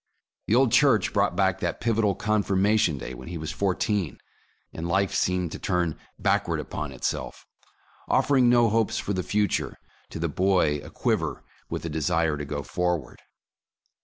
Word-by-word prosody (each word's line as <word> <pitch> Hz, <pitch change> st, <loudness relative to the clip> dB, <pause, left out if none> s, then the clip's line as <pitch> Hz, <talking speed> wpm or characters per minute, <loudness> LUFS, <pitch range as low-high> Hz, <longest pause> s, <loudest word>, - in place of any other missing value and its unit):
The 110 Hz, -, +3 dB
old 130 Hz, -1 st, +4 dB
church 120 Hz, -9 st, +4 dB
brought 100 Hz, -3 st, +2 dB
back 95 Hz, -1 st, +1 dB
that -, -, -2 dB
pivotal 110 Hz, -3 st, +1 dB
Confirmation 100 Hz, -4 st, +2 dB
Day, 65 Hz, 0 st, -6 dB
when 65 Hz, 0 st, -10 dB
he 85 Hz, 0 st, -5 dB
was 80 Hz, -1 st, -4 dB
fourteen, 95 Hz, -, -1 dB, 0.6 s
and 80 Hz, +1 st, -4 dB
life 95 Hz, +2 st, +1 dB
seemed 90 Hz, -2 st, 0 dB
to -, -, -6 dB
turn 90 Hz, -4 st, 0 dB, 0.2 s
backward -, -, +1 dB
upon 75 Hz, -2 st, -5 dB
itself, 65 Hz, -, -4 dB, 0.6 s
offering 130 Hz, -3 st, +4 dB
no 120 Hz, -1 st, +5 dB
hopes 110 Hz, 0 st, +1 dB
for 100 Hz, -, -2 dB
the 95 Hz, -, -1 dB
future 105 Hz, +2 st, -1 dB, 0.3 s
to -, -, -7 dB
the 85 Hz, +1 st, -1 dB
boy 90 Hz, -2 st, +2 dB
aquiver -, -, -2 dB, 0.3 s
with -, -, -4 dB
the 85 Hz, -, -3 dB
de 80 Hz, +1 st, -2 dB
sire 80 Hz, -1 st, +1 dB
to 75 Hz, 0 st, -5 dB
go 70 Hz, 0 st, -4 dB
forward. 90 Hz, -2 st, -2 dB
90 Hz, 160 wpm, -26 LUFS, 80-105 Hz, 0.6 s, no